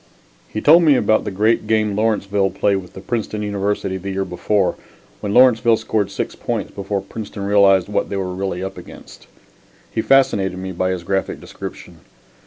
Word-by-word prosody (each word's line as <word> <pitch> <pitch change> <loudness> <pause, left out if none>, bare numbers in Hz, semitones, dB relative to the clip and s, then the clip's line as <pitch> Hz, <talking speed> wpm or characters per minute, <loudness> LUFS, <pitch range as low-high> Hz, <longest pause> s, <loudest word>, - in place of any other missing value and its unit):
He 110 - -4
told 165 +4 +7
me 155 -4 +5
about 110 -3 +2
the - - -2
great 105 +4 +1
game 110 -2 +1
Lawrenceville 100 -2 +1
played 100 0 +1
with 90 -2 -9
the 95 - -9
Princeton 105 -1 -3
Varsity 100 -1 -1
the 95 +1 -6
year 95 0 -2
before, 95 +2 0 0.5
when 100 - -4
Lawrenceville 120 -1 +5
scored 110 -2 -1
six - - -4
points - - -4
before 100 0 -3
Princeton 100 0 -7
realized 100 -2 +4
what 105 - -1
they 100 - -3
were 95 -1 -3
really 95 -1 -3
up 95 0 -6
against. - - -14 0.6
He 110 - -1
fascinated 110 -9 +2
me 95 0 -5
by 95 +1 -1
his 90 -2 -3
graphic 95 +2 -2
description. - - -9
100 Hz, 180 wpm, -19 LUFS, 95-110 Hz, 0.6 s, told